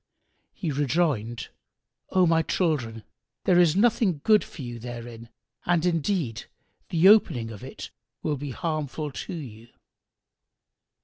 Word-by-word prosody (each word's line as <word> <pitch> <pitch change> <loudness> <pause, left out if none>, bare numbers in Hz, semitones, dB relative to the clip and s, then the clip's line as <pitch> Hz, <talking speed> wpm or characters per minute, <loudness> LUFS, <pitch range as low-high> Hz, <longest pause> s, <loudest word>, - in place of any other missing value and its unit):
He 170 -6 -3
rejoined, 135 -5 0 0.6
"O 185 -1 +4
my 165 -1 +3
children, 130 - -1 0.4
there 180 -2 +5
is 170 -2 +5
nothing 215 -6 +3
good 215 -1 +5
for 145 - -10
you 120 -1 -6
therein 120 -1 -8 0.3
and 175 -1 +1
indeed 165 - -1 0.4
the 170 +2 +4
opening 125 - +5
of 105 - -10
it - - -8 0.3
will 150 - 0
be 145 +1 -6
harmful 155 0 -3
to 135 - -6
you." 115 -7 -9
150 Hz, 125 wpm, -26 LUFS, 120-175 Hz, 0.6 s, there